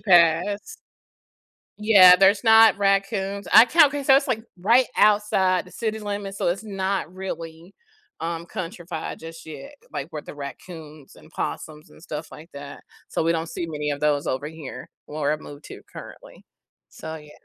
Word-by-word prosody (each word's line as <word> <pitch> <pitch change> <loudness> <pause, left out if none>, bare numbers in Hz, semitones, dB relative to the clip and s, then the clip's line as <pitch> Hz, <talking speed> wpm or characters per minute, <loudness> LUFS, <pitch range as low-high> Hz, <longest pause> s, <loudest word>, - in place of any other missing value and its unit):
passed. 185 - +2 1.1
Yeah, 190 -4 +8
there's 195 +3 +4
not 225 -1 +6
raccoons, 195 0 -1
I 230 - +9
count 295 +2 +4
'cause 285 -2 -4
that 270 - +8
was, 275 +1 +3
like, 225 -4 -2 0.2
right 235 +8 +4
outside 200 -4 +2
the 180 - -16
city 220 -1 -4
limits, 205 -1 -5
so - - 0
it's 195 +5 -2
not 195 -3 -3
really, 170 -2 -8 0.5
um, 165 +1 -5
countryfied 175 -3 -6
just 165 0 -11
yet, 275 - -10 0.2
like, 140 - -5
where 150 - -7
the - - -11
raccoons 150 0 -10
and - - -18
possums 155 0 -6
and - - -18
stuff 155 -2 -7
like 160 +3 -13
that, 140 0 -10 0.2
so - - -2
we 165 - +1
don't 165 0 -1
see 165 +1 -5
many 150 -1 -3
of 145 - -4
those 150 -1 0
over 140 +3 -3
here 160 -4 -10 0.2
where 150 -1 -2
I've 155 - -4
moved 145 0 -12
to - - -11
currently, - - -12 0.4
so 160 - -9
yeah. 150 -2 -12
180 Hz, 170 wpm, -23 LUFS, 155-205 Hz, 1.1 s, I